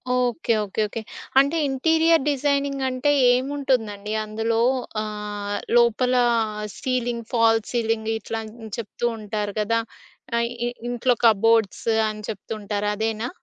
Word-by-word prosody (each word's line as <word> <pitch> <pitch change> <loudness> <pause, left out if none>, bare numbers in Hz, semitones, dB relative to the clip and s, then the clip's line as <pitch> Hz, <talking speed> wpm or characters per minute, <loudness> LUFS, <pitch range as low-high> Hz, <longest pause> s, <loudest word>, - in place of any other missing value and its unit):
Okay, 245 0 +1
okay, 205 +2 -3
okay. 225 +2 -5 0.4
అంటే 280 +4 +3
interior 320 +3 +3
designing 280 -1 0
అంటే 255 +3 +1 0.2
ఏముంటుందండి? 250 -6 -1
అందులో 225 +2 -1 0.4
ఆహ్, 210 -1 -4 0.2
లోపల 240 +2 +3 0.6
సీలింగ్, 245 -3 -2
ఫాల్స్ 225 -1 +3
సీలింగ్ 225 -1 0
ఇట్లా 225 +1 -4 0.4
చెప్తూ 230 +1 -4
ఉంటారు 210 -1 -3
కదా! 230 +2 +1 0.6
ఆహ్, 235 0 +1 0.2
ఇ - - 0 0.2
ఇంట్లో 245 +1 +1
కబోర్డ్స్ 225 -1 +3 0.2
అని 215 0 -7
చెప్తూ 215 +1 -5
ఉంటారు 205 0 -2
అదేనా? 220 +2 -2
230 Hz, 115 wpm, -23 LUFS, 215-255 Hz, 0.6 s, అంటే